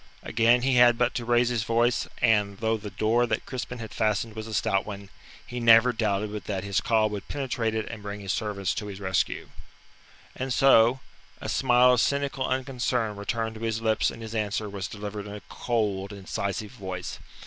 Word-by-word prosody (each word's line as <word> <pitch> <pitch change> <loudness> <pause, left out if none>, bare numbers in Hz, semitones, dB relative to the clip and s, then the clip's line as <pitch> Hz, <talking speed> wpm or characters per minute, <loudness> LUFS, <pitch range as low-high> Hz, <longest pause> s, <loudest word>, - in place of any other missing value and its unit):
Again, 120 +2 +3
he 130 -1 +2
had 120 -1 +6
but 125 0 +1
to 120 - -3
raise 120 0 +3
his 120 -2 0
voice, 115 +2 +1 0.2
and, 105 -4 +3
though 110 +1 0
the 105 -1 -6
door 110 +5 +1
that - - -2
Crispin 125 -1 -5
had 110 -2 -7
fastened 110 +1 0
was 110 0 -6
a 110 - -7
stout 95 +1 +1
one, 100 -2 -8 0.4
he 125 - -5
never 115 +1 +6
doubted 105 -2 -1
but 105 -4 -6
that 95 -3 -3
his 100 -1 0
call 110 -2 +3
would 100 -2 -6
penetrate 120 -5 -2
it 110 - -2
and 115 -3 -7
bring 100 0 -6
his 100 -3 -2
servants 100 -2 -2
to 105 - -5
his 100 -1 -7
rescue. 95 -2 -1 0.9
And 130 0 -4
so, 130 -1 +5 0.4
a - - -6
smile 125 -1 +4
of 125 - +3
cynical 140 -1 0
unconcern 125 -4 -1
returned 110 +2 -2
to - - -11
his 115 -1 -1
lips 110 -1 +1
and 115 - -9
his 110 0 -7
answer 105 -1 -1
was 100 -1 -5
delivered 105 0 -6
in 105 - -7
a 105 - -8
cold, 105 -5 -1
incisive 100 +1 -4
voice. 95 -7 -6
110 Hz, 200 wpm, -26 LUFS, 100-120 Hz, 0.9 s, had